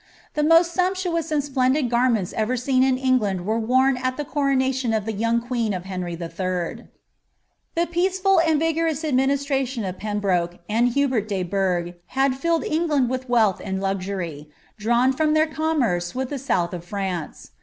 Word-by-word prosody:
The 300 - 0
most 330 +3 +5
sumptuous 360 -3 0
and 295 -2 +1
splendid 265 0 +1
garments 235 -5 +1
ever 225 +3 0
seen 255 +1 +1
in 260 -1 +3
England 220 -9 +1
were 220 +3 0
worn 255 +3 +3
at 255 0 -2
the 295 - -3
coronation 265 -3 0
of 215 -2 -1
the 220 - -2
young 230 +3 +1
queen 235 -4 -2
of 180 0 -6
Henry 180 -2 -4
III. 170 +1 -4 0.9
The 340 +1 +2
peaceful 370 +2 +2
and 320 -2 +3
vigorous 325 -1 0
administration 270 -3 0
of 185 -1 -5
Pembroke 195 -5 -1
and 230 +3 +2
Hubert 255 -5 0
de 195 -3 -1
Burgh 180 -2 -1 0.2
aad 270 -1 +3
filled 330 +4 0
England 300 -6 +1
with 255 0 -4
wealth 220 -6 +3
and 190 -1 -3
luxury, 185 -6 -3 0.3
drawn 240 +4 +2
from 310 +2 +1
their 310 0 +4
commerce 275 - -1
with 260 +1 -3
the 285 - -3
south 180 -10 0
of 175 -2 -5
France. 185 -3 -5
255 Hz, 165 wpm, -23 LUFS, 195-285 Hz, 0.9 s, most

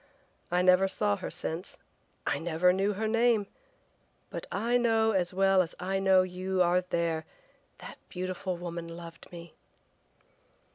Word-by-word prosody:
I 180 +1 +2
never 185 +1 +5
saw 205 +1 0
her 185 - -5
since, 170 0 -5 0.5
I - - 0
never 170 +2 +2
knew 195 +2 +1
her 220 +3 -2
name, 230 -1 +3 0.9
but - - -5
I 230 +4 0
know 225 -2 +3
as 180 -4 0
well 195 0 +4
as 170 - -4
I 190 +1 -1
know 190 -1 +5
you 185 +1 -3
are 180 +1 +3
there 170 -3 -1 0.5
that - - -10
beautiful 185 0 -4
woman 170 -1 -6
loved 165 0 -10
me!" 170 -1 -10
185 Hz, 145 wpm, -29 LUFS, 175-195 Hz, 0.9 s, never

